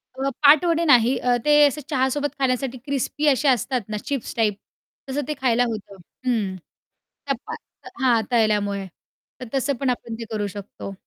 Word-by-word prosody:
अ, 270 +1 -1
पाटवडे 330 +3 +5
नाही. 250 -3 +5
अ, 245 -1 +2
ते 295 0 +6
असं 285 +2 -4
चहासोबत 280 +1 0
खाण्यासाठी 255 -1 0
क्रिस्पी 280 +2 -1
असे 285 0 +3
असतात 255 0 +1
ना 215 - -2
चिप्स 275 -5 -4
टाइप, 215 -3 +1 0.5
तसं 280 +2 -1
ते 305 - -1
खायला 245 -2 +3
होतं. 210 -3 -6 0.3
हं. 215 -7 0 0.7
त्या 275 -1 0
पा 455 +2 -5 0.5
हां, 240 -3 +4
तळल्यामुळे. 205 -4 +1 0.5
तर 255 - -7
तसं 270 +1 +1
पण 270 - 0
आपण 235 -2 -3
ते 230 - -5
करू 210 -2 -2
शकतो. 200 0 -8
255 Hz, 165 wpm, -23 LUFS, 225-280 Hz, 0.7 s, ते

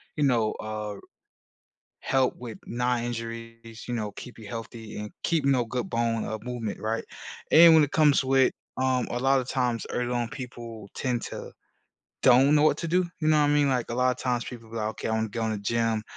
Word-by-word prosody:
you 150 - 0
know, 120 -6 +2
uh, 105 -1 -5 1.1
help 130 -1 +1
with 120 -3 -8
knee 125 0 0
injuries, 115 -1 -7
you 120 - -2
know, 105 -3 -3
keep 125 +3 -10
you 110 - -10
healthy 115 0 -7
and 105 0 -6
keeping 145 -5 +2
up 120 -3 0
good 125 0 -3
bone, 115 -1 0
uh, 110 - -4
movement, 120 -4 -4
right? 110 +1 -2 0.5
And 165 +1 +9
when 155 -1 +7
it 145 - -7
comes 150 -3 +4
with 130 0 +4 0.2
um, 130 -1 +1
a 120 - -1
lotta 135 0 +2
times, 125 -3 -1
early 125 0 -1
on, 120 -1 -1
people 115 -5 -8
tend 125 -2 -1
to - - -7 0.7
don't 135 +3 +6
know 150 - +4
what 155 - +4
to 170 - -3
do, 180 +2 +2
you 155 - +1
know 155 -1 +5
what 150 - +4
I - - +2
mean? 145 -1 +3
Like, 125 -3 0
a - - -2
lotta 125 0 +1
times, 125 -2 -1
people 115 -3 -9
be - - -10
like, 110 -1 -1
"Okay, 110 - -5
I - - -1
wanna 110 0 0
go 115 +2 -3
in 110 - 0
the 105 - -3
gym. 115 +1 0
120 Hz, 215 wpm, -27 LUFS, 115-130 Hz, 1.1 s, And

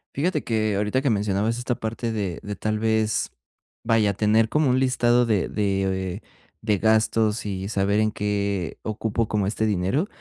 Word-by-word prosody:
Fíjate 175 +7 0
que 110 -2 0
ahorita 105 +6 0
que 135 - +1
mencionabas 105 +1 0
esta 125 0 -2
parte 115 0 -3
de 100 -6 -3
de 105 0 -5
tal 110 +1 -2
vez, 110 0 0 0.5
vaya, 110 -3 +2
tener 110 +2 +3
como 150 +3 +1
un 125 +1 +3
listado 125 -2 +3
de 110 -5 0
de 95 -1 -1 0.4
de 105 -2 +1
gastos 110 0 +2
y 95 -1 -4
saber 100 0 +1
en 110 0 +2
qué 100 -4 -2
ocupo 110 +1 -2
como 105 -2 0
este 110 +2 -1
dinero. 105 - 0
110 Hz, 165 wpm, -24 LUFS, 100-115 Hz, 0.5 s, tener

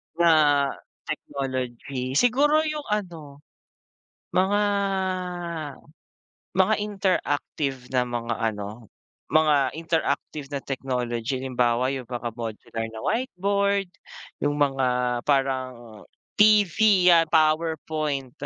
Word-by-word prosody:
Na 155 -4 +4 0.4
technology? 130 -1 -4
Siguro 290 - +4
yung 305 -1 -3
ano, 165 -9 -4 0.9
mga 195 +3 +3 1.9
mga 190 +3 +3
interactive 150 -9 -1
na 125 - +4
mga 120 -1 -3 0.2
ano, 105 +2 -8 0.4
mga 150 -2 +3
interactive 160 -3 -2
na 140 -1 -3
technology. 125 -2 -3
Halimbawa, 125 -1 +1
yung 130 - -5
mga 120 -1 -3
modular 115 0 -5
na 110 - -7
whiteboard, 200 - 0 0.6
yung 145 0 0
mga 135 -2 +2 0.4
parang 130 -5 -1 0.4
TV 210 -2 +5
'yan, 170 -2 +6
PowerPoint, 155 -3 0
145 Hz, 90 wpm, -25 LUFS, 125-180 Hz, 1.9 s, yan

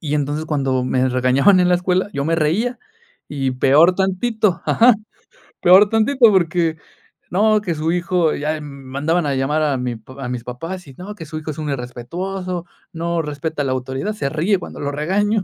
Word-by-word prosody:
Y 150 -2 -2
entonces, 145 +1 -1
cuando 135 -4 0
me 130 0 +1
regañaban 130 +9 +4
en 180 - +3
la 180 - +4
escuela, 180 +2 0
yo 140 0 -2
me 165 +1 +1
reía, 180 +11 0 0.5
y 135 -2 -2
peor 145 +7 +4
tantito, 195 +1 0
ajá, 240 +1 +5 0.7
peor 190 +3 +7
tantito 225 +2 +4
porque 170 -3 +1 0.5
no, 215 +3 +3
que 175 -5 -2
su 155 +2 -1
hijo 175 -2 +1
ya 155 +1 -2
mandaban 140 +4 -2
a 140 -2 0
llamar 150 +4 0
a 145 -3 +1
mi 125 -1 -3
pap 130 +5 -15
a 125 -2 -4
mis 125 -2 -4
papás 165 +10 -6
y 135 - -12
no, 205 +3 -8
que 165 - -9
su 155 +1 -7
hijo 155 0 -5
es 145 - -10
un 150 - -3
irrespetuoso, 175 +9 -5 0.3
no 170 0 -1
respeta 150 0 -4
la 135 - -1
autoridad, 130 +10 -3
se 175 -10 -3
ríe 170 +7 +1
cuando - - -9
lo 145 0 -2
regaño. 195 +8 0
160 Hz, 190 wpm, -19 LUFS, 140-185 Hz, 0.7 s, peor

